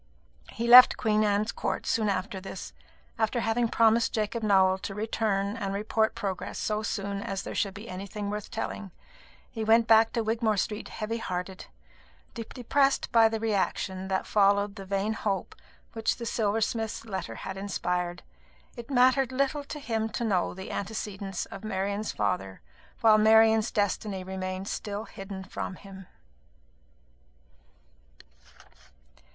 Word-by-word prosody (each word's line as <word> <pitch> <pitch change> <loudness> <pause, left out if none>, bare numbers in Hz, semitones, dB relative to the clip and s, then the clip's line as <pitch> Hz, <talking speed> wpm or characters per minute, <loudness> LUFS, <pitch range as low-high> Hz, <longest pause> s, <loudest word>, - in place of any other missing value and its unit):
He 235 +1 -3
left 250 +1 +10
Queen 215 -1 +2
Anne's 210 +1 +1
Court - - -3
soon 215 -2 +1
after 190 0 -2
this, 195 0 -8 0.5
after 220 +2 +1
having 230 +1 +1
promised 225 0 +3
Jacob 220 +1 -1
Nowell 190 -3 +4
to 195 - -6
return 210 -2 -1
and 200 -4 -3
report 220 +2 0
progress 190 -3 -4
so 215 0 -1
soon 200 -2 -3
as 195 -1 -4
there - - -6
should 195 -3 -1
be 210 +3 -9
anything 200 +2 -5
worth 210 -1 -5
telling. 205 -2 -5 0.6
He 225 - -4
went 225 +1 +5
back 225 0 +5
to 230 - 0
Wigmore 220 -1 0
Street 210 +2 -2
heavy 225 +1 -4
hearted, 185 -2 -5 0.7
depressed 260 +4 0
by 225 -1 +6
the 225 0 -2
reaction 190 -3 -1
that 190 0 -1
followed 200 0 +3
the 195 -2 -8
vain 200 +3 -1
hope 200 -4 -2 0.4
which 225 -1 0
the 235 - -7
silversmith's 225 0 -1
letter 190 - -5
had - - -6
inspired. 180 -3 -2 0.5
It 235 +2 -9
mattered 260 0 +4
little 275 +2 0
to 300 - -7
him 225 -5 -2
to - - -2
know 190 -7 0
the 190 0 -7
antecedents 200 -2 -4
of - - -10
Marian's 200 0 -2
father, 95 -2 -2 0.4
while 215 -1 +6
Marian's 220 +1 +5
destiny 205 -2 -1
remained 185 0 -5
still 205 0 -4
hidden 195 -3 -8
from 185 0 -5
him. 190 -1 -12
210 Hz, 145 wpm, -28 LUFS, 195-225 Hz, 0.7 s, left